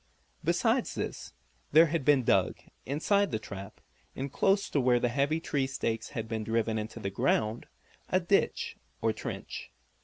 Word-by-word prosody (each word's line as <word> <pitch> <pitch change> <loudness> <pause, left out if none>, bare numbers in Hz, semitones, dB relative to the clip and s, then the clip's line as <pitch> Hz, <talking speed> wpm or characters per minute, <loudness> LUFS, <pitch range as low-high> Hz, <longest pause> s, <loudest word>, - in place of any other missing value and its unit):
Besides - - +1
this - - -4 0.4
there 160 +2 +9
had 165 -2 -1
been 140 -2 +4
dug, - - +2 0.3
inside 200 +9 +2
the 115 - -1
trap, 100 -2 -9 0.4
and 135 +1 -4
close 195 +1 +3
to 140 - +2
where 125 -1 +4
the 120 - +1
heavy 140 +5 +1
tree 140 -5 -1
stakes 115 -4 -2
had 115 0 -2
been 110 -1 -3
driven 115 0 0
into 110 +1 -6
the 100 - -3
ground, 110 +3 0 0.4
a 185 - +3
ditch, 190 +2 +1 0.3
or - - +3
trench. - - -6
130 Hz, 160 wpm, -30 LUFS, 110-155 Hz, 0.4 s, there